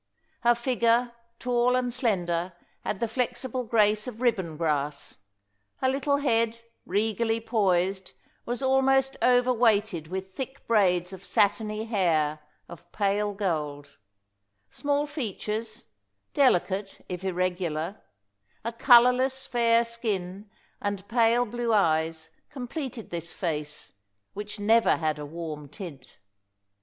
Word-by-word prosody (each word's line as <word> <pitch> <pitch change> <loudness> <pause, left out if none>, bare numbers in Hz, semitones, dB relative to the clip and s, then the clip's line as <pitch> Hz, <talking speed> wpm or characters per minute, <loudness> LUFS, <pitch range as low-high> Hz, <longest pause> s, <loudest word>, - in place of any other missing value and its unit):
Her 240 0 +4
figure, 235 0 +2 0.3
tall 245 0 +2
and 250 -1 0
slender, 180 -8 0 0.3
had 195 - -3
the 235 - 0
flexible 250 +1 -2
grace 215 -1 +2
of 235 -3 -7
ribbon 190 -11 0
grass; 150 -3 -1 0.6
her 260 - -1
little 280 +2 +1
head, 230 -4 +1 0.3
regally 225 +3 +1
poised, 195 -4 0 0.3
was 245 +3 -3
almost 265 0 +3
overweighted 225 -8 +3
with 190 +2 -5
thick 265 +3 -6
braids 185 -5 +2
of 190 0 -10
satiny 215 +2 +1
hair 165 -8 +1 0.3
of 170 - -13
pale 205 0 0
gold; 150 -7 -3 0.7
small 290 0 0
features, 220 - -4 0.5
delicate, 195 -6 +1
if 180 0 -5
irregular, 180 -1 -2 0.6
a 230 - -2
colourless, 250 +2 +5
fair 235 -1 +3
skin, 210 -4 -4 0.3
and 200 -1 -3
pale 235 +1 +3
blue 240 +1 -2
eyes, 160 -4 +1 0.2
completed 260 -3 -6
this 170 -1 -5
face, 150 -4 -4 0.4
which 210 +1 -6
never 225 +3 +4
had 155 -2 -1
a 145 - -6
warm 155 -2 -6
tint. 150 -6 -10
215 Hz, 115 wpm, -27 LUFS, 180-240 Hz, 0.7 s, colourless